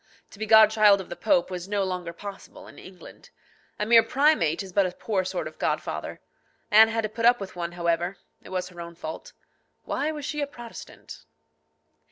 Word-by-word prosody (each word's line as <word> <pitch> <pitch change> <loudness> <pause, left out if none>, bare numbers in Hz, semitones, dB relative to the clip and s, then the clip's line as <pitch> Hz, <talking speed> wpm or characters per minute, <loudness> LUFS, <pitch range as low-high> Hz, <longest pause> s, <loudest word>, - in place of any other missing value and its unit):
To 200 - -15
be 220 - -3
godchild 215 -2 +6
of 190 - -8
the - - -6
Pope 270 -4 +1
was 180 0 -5
no 205 -1 0
longer 180 -2 -4
possible 200 +3 -10
in - - -14
England. 185 -1 -14 0.5
A 210 - -1
mere 230 +1 +7
primate 260 - +2
is 190 -2 -11
but 200 -1 +3
a - - -5
poor 195 -1 -2
sort 185 - -4
of - - -12
godfather. - - -3 0.5
Anne 220 +1 +8
had 225 0 -1
to - - 0
put 230 +2 -6
up 245 0 +5
with 195 -2 -8
one, 175 -1 -4
however. 175 +2 -1 0.2
It - - -14
was 185 -1 -3
her 175 -1 -10
own 170 0 -9
fault. 160 -1 -8 0.5
Why 300 +3 -2
was 300 -2 -6
she 300 0 -3
a 285 - -1
Protestant? 240 -4 -11
200 Hz, 200 wpm, -25 LUFS, 180-225 Hz, 0.5 s, Anne